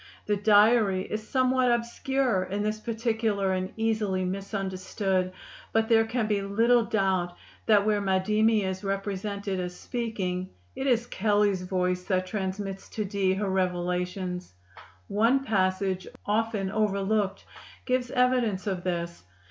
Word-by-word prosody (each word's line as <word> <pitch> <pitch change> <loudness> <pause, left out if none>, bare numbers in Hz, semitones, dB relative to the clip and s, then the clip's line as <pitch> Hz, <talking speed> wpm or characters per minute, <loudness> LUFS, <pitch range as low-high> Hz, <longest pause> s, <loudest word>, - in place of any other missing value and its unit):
The 210 - +1
diary 205 -1 +4
is 215 +2 -4
somewhat 255 -1 +3
obscure 240 -1 0
in 200 +2 -2
this 215 0 -1
particular 220 -3 0
and 185 0 -2
easily 215 -4 0
misunderstood; 190 -1 -2 0.4
but 225 0 +2
there 225 -1 +5
can 230 0 -1
be 210 -2 0
little 230 +5 +3
doubt 190 -5 0 0.3
that 205 -2 +5
where 210 -1 +2
Madimi 210 +3 +2
is 190 +1 -3
represented 195 0 -3
as 180 0 -4
speaking, 190 -7 -3 0.3
it 270 - -2
is 240 -2 +2
Kelley's 205 -3 +1
voice 180 0 -1
that 185 -1 0
transmits 195 0 -4
to 215 - -3
Dee 190 -1 +1
her 200 +1 -1
revelations. 180 - -2 0.5
One 230 +7 +2
passage, 185 -4 0 0.2
often 210 -2 0
overlooked, 200 -1 0 0.4
gives 255 -1 0
evidence 250 -7 +1
of 190 -3 -2
this. 170 -1 -3
200 Hz, 130 wpm, -27 LUFS, 185-220 Hz, 0.5 s, there